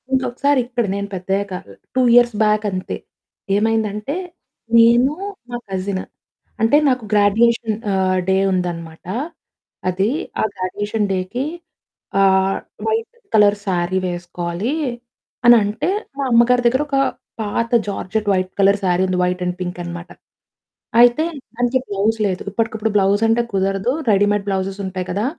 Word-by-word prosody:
ఇంకొకసారి 260 Hz, +2 st, +1 dB
ఇక్కడ 240 Hz, -1 st, -1 dB
నేను 200 Hz, 0 st, -3 dB
పెద్దయ్యాక 195 Hz, +2 st, -2 dB, 0.4 s
2 260 Hz, -, +3 dB
ఇయర్స్ 240 Hz, -2 st, +5 dB
బ్యాకంతే. 210 Hz, -3 st, 0 dB, 0.6 s
ఏమైందంటే 215 Hz, +3 st, 0 dB, 0.6 s
నేను 235 Hz, +4 st, +5 dB, 0.4 s
మా 240 Hz, -, -3 dB
కజిను. 190 Hz, 0 st, -2 dB, 0.6 s
అంటే 225 Hz, +6 st, +5 dB
నాకు 255 Hz, -2 st, 0 dB
గ్రాడ్యుయేషన్ 220 Hz, +2 st, +3 dB, 0.2 s
ఆహ్, 185 Hz, -1 st, +1 dB
డే 190 Hz, -, +3 dB, 0.2 s
ఉందన్నమాట. 170 Hz, -3 st, -4 dB, 0.8 s
అది 190 Hz, +3 st, +1 dB, 0.3 s
ఆ -, -, +2 dB
గ్రాడ్యుయేషన్ 205 Hz, +3 st, -2 dB
డేకి. 190 Hz, +8 st, -2 dB, 0.8 s
ఆహ్, 190 Hz, 0 st, +3 dB, 0.3 s
వైట్ 450 Hz, +2 st, -1 dB, 0.2 s
కలర్ 210 Hz, -1 st, +5 dB
శారీ 180 Hz, 0 st, 0 dB
వేసుకోవాలి. 175 Hz, +5 st, -3 dB, 0.7 s
అనంటే 220 Hz, -, +4 dB, 0.3 s
మా 280 Hz, -, -1 dB
అమ్మ 235 Hz, 0 st, +7 dB
గారి 250 Hz, 0 st, +3 dB
దగ్గర 260 Hz, +4 st, +2 dB
ఒక 275 Hz, -1 st, 0 dB, 0.4 s
పాత 230 Hz, +3 st, -2 dB, 0.2 s
జార్జెట్ 205 Hz, +1 st, -3 dB
వైట్ 185 Hz, 0 st, -1 dB
కలర్ 200 Hz, +1 st, +4 dB
శారీ 180 Hz, 0 st, +2 dB
ఉంది 185 Hz, -1 st, -1 dB
వైట్ 180 Hz, 0 st, -1 dB
అండ్ 180 Hz, 0 st, -2 dB
పింక్ 180 Hz, 0 st, -4 dB
అనమాట. 170 Hz, 0 st, -7 dB, 0.9 s
అయితే 245 Hz, +6 st, +5 dB, 0.3 s
దానికి 245 Hz, +2 st, +1 dB
బ్లౌజ్ 205 Hz, +3 st, 0 dB
లేదు. 185 Hz, -2 st, -3 dB
ఇప్పటికిప్పుడు 220 Hz, 0 st, -1 dB
బ్లౌజ్ 200 Hz, +1 st, +3 dB
అంటే 225 Hz, +1 st, +3 dB
కుదరదు. 195 Hz, +4 st, 0 dB, 0.2 s
రెడీమేడ్ 205 Hz, 0 st, +2 dB
బ్లౌజెస్ 195 Hz, 0 st, -2 dB
ఉంటాయి 185 Hz, -1 st, -4 dB
కదా! 205 Hz, +5 st, -1 dB
205 Hz, 130 wpm, -19 LUFS, 185-230 Hz, 0.9 s, అమ్మ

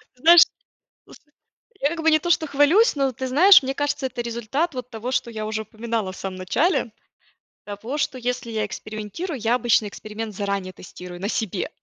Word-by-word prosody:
знаешь 330 Hz, +6 st, +8 dB, 0.6 s
просто 295 Hz, -, -18 dB, 0.5 s
я 285 Hz, -, +2 dB
как 330 Hz, -1 st, -4 dB
бы 320 Hz, -, +4 dB
не 310 Hz, -, +5 dB
то, 345 Hz, +2 st, -4 dB
что 315 Hz, -1 st, +3 dB
хвалюсь, 305 Hz, -, +4 dB
но 275 Hz, -1 st, +1 dB
ты 260 Hz, +2 st, -5 dB
знаешь, 360 Hz, +9 st, +7 dB
мне 265 Hz, +1 st, -3 dB
кажется, 290 Hz, -1 st, -1 dB
это 250 Hz, -2 st, -6 dB
результат 235 Hz, +8 st, -2 dB
вот 250 Hz, -1 st, -6 dB
того, 240 Hz, +2 st, -5 dB
что 250 Hz, -2 st, -1 dB
я 215 Hz, -1 st, -5 dB
уже 220 Hz, 0 st, -3 dB
упоминала 220 Hz, -3 st, -4 dB
в -, -, -12 dB
самом 190 Hz, -1 st, -6 dB
начале, 245 Hz, -, 0 dB, 0.7 s
того, 220 Hz, +8 st, -6 dB
что 275 Hz, -, -1 dB
если 245 Hz, -1 st, -3 dB
я 215 Hz, -1 st, -1 dB
экспериментирую, 215 Hz, -, -6 dB
я 230 Hz, +2 st, +1 dB
обычно 230 Hz, -3 st, +2 dB
эксперимент 215 Hz, +1 st, -7 dB
заранее 200 Hz, -2 st, -3 dB
тестирую 180 Hz, -1 st, -11 dB
на 200 Hz, -, -2 dB
себе 215 Hz, -6 st, -2 dB
240 Hz, 190 wpm, -23 LUFS, 215-290 Hz, 0.7 s, знаешь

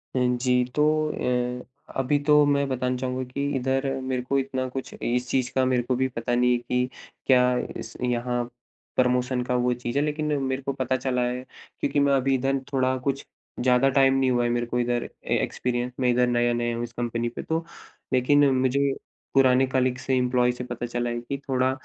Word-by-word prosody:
अ, -, -, +2 dB, 0.2 s
जी, 125 Hz, -1 st, +3 dB
तो 150 Hz, -, +3 dB, 0.8 s
अ, -, -, -13 dB, 0.4 s
अभी 135 Hz, +3 st, +2 dB
तो 150 Hz, -1 st, +6 dB
मैं 140 Hz, -1 st, +2 dB
बताना 125 Hz, -1 st, -1 dB
चाहूँगा 130 Hz, 0 st, -2 dB
कि 140 Hz, +2 st, -2 dB
इधर 135 Hz, +1 st, 0 dB, 0.2 s
मेरे 130 Hz, -1 st, -2 dB
को 135 Hz, +2 st, -1 dB
इतना 130 Hz, -1 st, -2 dB
कुछ 130 Hz, +1 st, -6 dB
इस 125 Hz, +1 st, -1 dB
चीज़ 130 Hz, -1 st, 0 dB
का 130 Hz, -, +3 dB
मेरे 125 Hz, -1 st, +1 dB
को 125 Hz, +1 st, 0 dB
भी 130 Hz, +1 st, +1 dB
पता 120 Hz, -1 st, -2 dB
नहीं 125 Hz, 0 st, +3 dB
है -, -, +2 dB
कि 125 Hz, +1 st, -1 dB, 0.4 s
क्या 125 Hz, -1 st, +4 dB, 0.2 s
इस -, -, -8 dB
यहाँ, 120 Hz, 0 st, 0 dB, 0.5 s
प्रमोशन 125 Hz, 0 st, +1 dB
का 125 Hz, -, -1 dB
वो 125 Hz, 0 st, +2 dB
चीज़ 120 Hz, +1 st, -4 dB
है, 145 Hz, -, +3 dB
लेकिन 150 Hz, 0 st, -1 dB
मेरे 130 Hz, 0 st, -1 dB
को 140 Hz, +1 st, -3 dB
पता 130 Hz, -1 st, -1 dB
चला 125 Hz, 0 st, -1 dB
है 125 Hz, +1 st, -3 dB, 0.4 s
क्योंकि 145 Hz, -, 0 dB
मैं 140 Hz, 0 st, +3 dB
अभी 135 Hz, 0 st, +2 dB
इधर 135 Hz, +1 st, +1 dB, 0.2 s
थोड़ा 130 Hz, -1 st, +2 dB
कुछ 140 Hz, -1 st, -1 dB, 0.3 s
ज़्यादा 125 Hz, +2 st, +4 dB
टाइम 135 Hz, 0 st, +4 dB
नहीं 135 Hz, -1 st, +2 dB
हुआ 120 Hz, -1 st, +2 dB
है 120 Hz, -, +1 dB
मेरे 120 Hz, 0 st, 0 dB
को 125 Hz, +1 st, -2 dB
इधर 120 Hz, 0 st, 0 dB, 0.2 s
ए -, -, +1 dB
एक्सपीरियंस 125 Hz, 0 st, -2 dB
मैं 125 Hz, -, +2 dB
इधर 125 Hz, +1 st, +3 dB
नया-नया 120 Hz, -1 st, +1 dB
हूँ 120 Hz, -, -3 dB
इस 120 Hz, 0 st, -7 dB
कंपनी 120 Hz, 0 st, -2 dB
पे 120 Hz, -, -7 dB
तो, 165 Hz, +1 st, -2 dB, 0.5 s
लेकिन 140 Hz, +3 st, +4 dB
मुझे 135 Hz, +1 st, +2 dB, 0.4 s
पुराने 130 Hz, -1 st, +5 dB
कलीग्स 130 Hz, -1 st, 0 dB
से, 135 Hz, -, +2 dB
एम्प्लॉयज 125 Hz, -1 st, +2 dB
से 125 Hz, -, -4 dB
पता 120 Hz, -1 st, -5 dB
चला 120 Hz, 0 st, -2 dB
है 120 Hz, 0 st, -2 dB
कि 140 Hz, +3 st, -4 dB
थोड़ा 130 Hz, 0 st, +2 dB
125 Hz, 205 wpm, -25 LUFS, 125-135 Hz, 0.8 s, तो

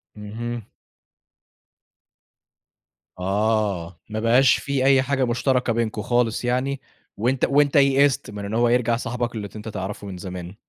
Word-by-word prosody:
اهم. 115 Hz, +2 st, -6 dB, 2.5 s
آه، 95 Hz, -3 st, -1 dB
ما 110 Hz, -, -3 dB
بقاش 115 Hz, 0 st, +4 dB
في 140 Hz, -2 st, -1 dB
أي 135 Hz, -1 st, +5 dB
حاجة 135 Hz, 0 st, 0 dB
مشتركة 125 Hz, 0 st, +1 dB
بينكم 110 Hz, -2 st, -1 dB
خالص 120 Hz, 0 st, 0 dB
يعني 130 Hz, +2 st, -1 dB, 0.4 s
وأنت 125 Hz, +4 st, +1 dB
وأنت 145 Hz, +1 st, +2 dB
يئست 140 Hz, -4 st, +3 dB
من 100 Hz, -1 st, -6 dB
إن 105 Hz, -, -5 dB
هو 120 Hz, +1 st, +3 dB
يرجع 120 Hz, -1 st, +2 dB
صاحبك 120 Hz, 0 st, -3 dB
اللي 105 Hz, -2 st, -4 dB
ت 100 Hz, -, -19 dB
أنت 105 Hz, +1 st, -8 dB
تعرفه 100 Hz, 0 st, -6 dB
من 95 Hz, -2 st, -7 dB
زمان. 90 Hz, 0 st, -7 dB
115 Hz, 140 wpm, -23 LUFS, 105-130 Hz, 2.5 s, أي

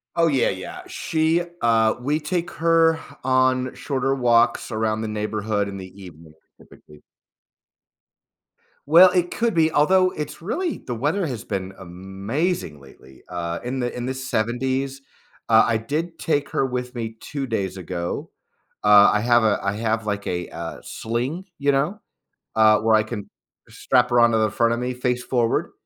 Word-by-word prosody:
Oh, 170 Hz, -1 st, +3 dB
yeah, 135 Hz, -6 st, +2 dB
yeah. 95 Hz, -1 st, -6 dB
She, 160 Hz, +2 st, 0 dB, 0.2 s
uh 115 Hz, -1 st, +3 dB
we 145 Hz, +5 st, 0 dB
take 175 Hz, +2 st, -3 dB
her 165 Hz, 0 st, +3 dB, 0.2 s
on 130 Hz, 0 st, +2 dB
shorter 135 Hz, -1 st, -1 dB
walks 120 Hz, -3 st, +2 dB
around 110 Hz, 0 st, -1 dB
the 110 Hz, -, -3 dB
neighborhood, 105 Hz, -1 st, -2 dB
in 100 Hz, -1 st, -6 dB
the 95 Hz, -1 st, -8 dB
evening, 80 Hz, -3 st, -13 dB, 0.3 s
typically. 75 Hz, -1 st, -18 dB, 1.9 s
Well, 170 Hz, +5 st, +8 dB
it 180 Hz, -1 st, 0 dB
could 235 Hz, -1 st, 0 dB
be, 160 Hz, -1 st, +3 dB
although 185 Hz, +5 st, +4 dB
it's 150 Hz, +1 st, -6 dB
really 325 Hz, -, -2 dB
the 125 Hz, -, -6 dB
weather 150 Hz, -, 0 dB
has 125 Hz, -8 st, -5 dB
been 95 Hz, -2 st, -4 dB
amazing 95 Hz, -, -4 dB
lately, 65 Hz, -1 st, -17 dB
uh, 85 Hz, -1 st, -4 dB
in 130 Hz, +2 st, -3 dB
the 120 Hz, -1 st, -2 dB
in 120 Hz, 0 st, -4 dB
the 130 Hz, -, -2 dB
70s. 130 Hz, +2 st, -2 dB, 0.5 s
Uh, 110 Hz, -1 st, +6 dB
I 115 Hz, -, +1 dB
did 160 Hz, +9 st, -4 dB
take 145 Hz, -3 st, 0 dB
her 135 Hz, -, 0 dB
with 125 Hz, -1 st, -4 dB
me 115 Hz, -2 st, -5 dB
2 140 Hz, -2 st, -5 dB
days 100 Hz, -4 st, -2 dB
ago. 85 Hz, -1 st, -4 dB, 0.5 s
Uh, 105 Hz, -1 st, +7 dB
I 105 Hz, -, +1 dB
have 120 Hz, 0 st, +4 dB
a 110 Hz, -2 st, +3 dB
I 100 Hz, 0 st, 0 dB
have, 110 Hz, +1 st, -1 dB
like, 100 Hz, -1 st, -3 dB
a, 90 Hz, -1 st, -3 dB
uh, 85 Hz, 0 st, -7 dB
sling, 125 Hz, +11 st, -4 dB
you 140 Hz, 0 st, +2 dB
know? 150 Hz, +10 st, 0 dB, 0.6 s
Uh, 110 Hz, -1 st, +5 dB
where 110 Hz, 0 st, +3 dB
I 110 Hz, -, +3 dB
can 105 Hz, -2 st, -7 dB, 0.4 s
strap 125 Hz, -1 st, +1 dB
her 120 Hz, -, +4 dB
onto 120 Hz, -1 st, +4 dB
the 110 Hz, 0 st, +2 dB
front 115 Hz, +2 st, +2 dB
of 120 Hz, -, -2 dB
me, 125 Hz, +1 st, -2 dB
face 125 Hz, 0 st, -1 dB
forward. 120 Hz, -3 st, 0 dB
120 Hz, 165 wpm, -23 LUFS, 105-145 Hz, 1.9 s, Well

